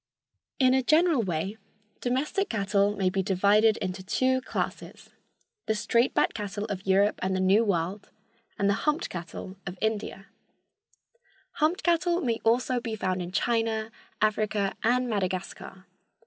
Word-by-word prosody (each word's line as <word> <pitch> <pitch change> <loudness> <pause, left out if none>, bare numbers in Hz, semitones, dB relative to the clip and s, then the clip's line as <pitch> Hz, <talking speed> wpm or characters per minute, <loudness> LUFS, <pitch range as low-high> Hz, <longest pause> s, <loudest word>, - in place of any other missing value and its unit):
In 255 -1 +4
a 265 - +3
general 310 +1 +3
way 190 +2 -3 0.4
domestic 280 +10 -1
cattle 200 -1 +1
may 190 -2 +1
be 195 - 0
divided 205 +3 +3
into 190 -1 -4
two 260 +7 +1
classes—the 255 - -6
straight 235 +4 +1
backed - - +2
cattle 205 -1 -4
of 200 -3 -6
Europe 200 +2 +3
and 190 0 0
the - - 0
New 195 +4 +4
World 195 0 -2 0.5
and 200 - +1
the 200 - +4 0.2
humped 300 - -1
cattle 185 +2 -7
of 180 +1 -5
India. 210 -2 -2 1.3
Humped 315 +4 0
cattle 345 0 +2
may 230 -3 -1
also 245 +2 +2
be 230 -2 -4
found 185 -3 -2
in 175 0 -5
China, 225 0 0 0.3
Africa 215 -2 0
and 250 +2 +2
Madagascar. 190 -2 -4
210 Hz, 140 wpm, -27 LUFS, 190-245 Hz, 1.3 s, In